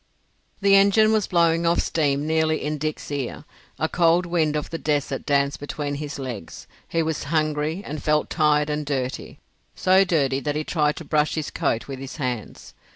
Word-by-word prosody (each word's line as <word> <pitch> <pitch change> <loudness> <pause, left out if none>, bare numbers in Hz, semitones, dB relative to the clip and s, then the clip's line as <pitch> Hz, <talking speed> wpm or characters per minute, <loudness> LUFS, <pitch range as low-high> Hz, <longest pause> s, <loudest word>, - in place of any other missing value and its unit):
The 200 0 +4
engine 200 +2 +5
was 215 -3 +1
blowing 170 -1 +2
off 170 - +3
steam 145 -2 0
nearly 160 0 +1
in 150 0 -2
Dick's 155 0 -4
ear; 140 -4 -4 0.3
a 160 - 0
cold 170 +1 +3
wind 165 -3 0
of 150 +1 -3
the 165 - -4
desert 145 -3 -1
danced 140 -1 +1
between 145 0 -4
his 145 0 -5
legs; 125 -10 -7 0.2
he 165 -1 0
was 160 -2 -3
hungry, 155 +3 -1
and 150 0 -5
felt 150 0 +1
tired 150 -2 +2
and 150 0 -2
dirty—so 145 +7 -1
dirty 140 -7 +1
that 145 +1 -2
he 155 - -1
tried 150 -2 +1
to 165 - -8
brush 150 0 +1
his 155 -2 -3
coat 115 - -1
with 135 -2 -6
his 135 0 -7
hands. 125 -7 -5
150 Hz, 180 wpm, -23 LUFS, 145-165 Hz, 0.3 s, engine